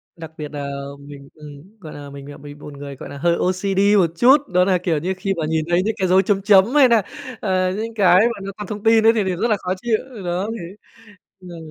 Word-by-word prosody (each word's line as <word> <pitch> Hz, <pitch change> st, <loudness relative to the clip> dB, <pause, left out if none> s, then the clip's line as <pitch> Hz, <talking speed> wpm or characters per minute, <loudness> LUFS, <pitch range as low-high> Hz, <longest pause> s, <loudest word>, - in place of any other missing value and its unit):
Đặc 160 Hz, -2 st, -10 dB
biệt 150 Hz, -1 st, -5 dB
nà, 140 Hz, -1 st, -5 dB, 0.3 s
mình 140 Hz, -1 st, -13 dB
ừm, 150 Hz, +7 st, -14 dB
gọi 160 Hz, -5 st, -10 dB
là, 145 Hz, -1 st, -10 dB
mình 140 Hz, 0 st, -11 dB
là -, -, -11 dB
bị 145 Hz, 0 st, -11 dB
bột 145 Hz, 0 st, -12 dB
người, 140 Hz, 0 st, -9 dB
gọi -, -, -10 dB
là, 140 Hz, -, -9 dB
hơi 170 Hz, +3 st, +1 dB
OCD 195 Hz, +2 st, +1 dB
một 170 Hz, -4 st, +2 dB
chút. 260 Hz, +4 st, +6 dB, 0.2 s
Đó 180 Hz, 0 st, +4 dB
nà, 185 Hz, -2 st, +2 dB
kiểu 165 Hz, -4 st, 0 dB
như, 180 Hz, +5 st, -2 dB
khi 195 Hz, 0 st, -2 dB
mà 160 Hz, -, -2 dB
nhìn 160 Hz, 0 st, -1 dB
thấy 175 Hz, +2 st, +2 dB
những 220 Hz, +1 st, -2 dB
cái 190 Hz, -, 0 dB
dấu 185 Hz, +1 st, +4 dB
chấm 195 Hz, 0 st, 0 dB
chấm 195 Hz, -1 st, +5 dB
hay 275 Hz, -3 st, +7 dB
nà, 230 Hz, -2 st, +4 dB, 0.4 s
ờ, 185 Hz, -2 st, 0 dB
những 220 Hz, +3 st, -5 dB
cái 185 Hz, -3 st, +5 dB
mà 230 Hz, -1 st, +1 dB
nó 195 Hz, -, -5 dB
còn 210 Hz, -2 st, -7 dB
thông 210 Hz, -1 st, -7 dB
tin 225 Hz, 0 st, +4 dB
ấy, 225 Hz, -, +6 dB
thì 215 Hz, -3 st, 0 dB
thì 185 Hz, -1 st, -2 dB
rất 230 Hz, -, -1 dB
là 210 Hz, -, +2 dB
khó 185 Hz, 0 st, -3 dB
chịu. 235 Hz, -2 st, +1 dB, 0.3 s
Đó, 180 Hz, +5 st, -2 dB
thế, 175 Hz, +3 st, -9 dB, 0.7 s
ờ 175 Hz, -2 st, -11 dB
185 Hz, 260 wpm, -20 LUFS, 155-205 Hz, 0.7 s, hay